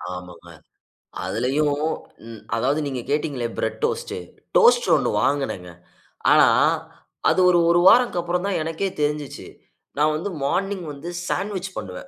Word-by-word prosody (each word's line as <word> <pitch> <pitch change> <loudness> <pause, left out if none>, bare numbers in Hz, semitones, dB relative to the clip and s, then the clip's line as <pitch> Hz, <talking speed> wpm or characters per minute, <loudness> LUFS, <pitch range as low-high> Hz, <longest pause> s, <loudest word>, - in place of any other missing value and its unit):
ஆமாங்க. 90 -1 -11 0.7
அதிலயும் 145 +3 0 0.5
ம் 115 -1 -10
அதாவது 130 +6 +1
நீங்க 130 -3 -4
கேட்டீங்களே, 140 -4 -1
பிரெட் - - -2
டோஸ்ட், 470 +1 -1 0.4
டோஸ்ட்ரு 485 0 +5
ஒண்ணு - - 0
வாங்குனேங்க. 115 -11 -1 0.6
ஆனா, - - +7 0.8
அது - - +2
ஒரு, 175 -1 +4
1 170 0 +4
வாரத்துக்கப்புறம் 180 -6 +3
தான் 200 - 0
எனக்கே 165 +5 -2
தெரிஞ்சுச்சு. 150 -2 -3 0.5
நான் 150 +1 +3
வந்து 165 +6 -3
மார்னிங் 190 +5 -1
வந்து 145 +5 -8 0.2
சாண்ட்விச் 195 -2 -2
பண்ணுவேன். 95 -3 -7
155 Hz, 125 wpm, -23 LUFS, 130-190 Hz, 0.8 s, ஆனா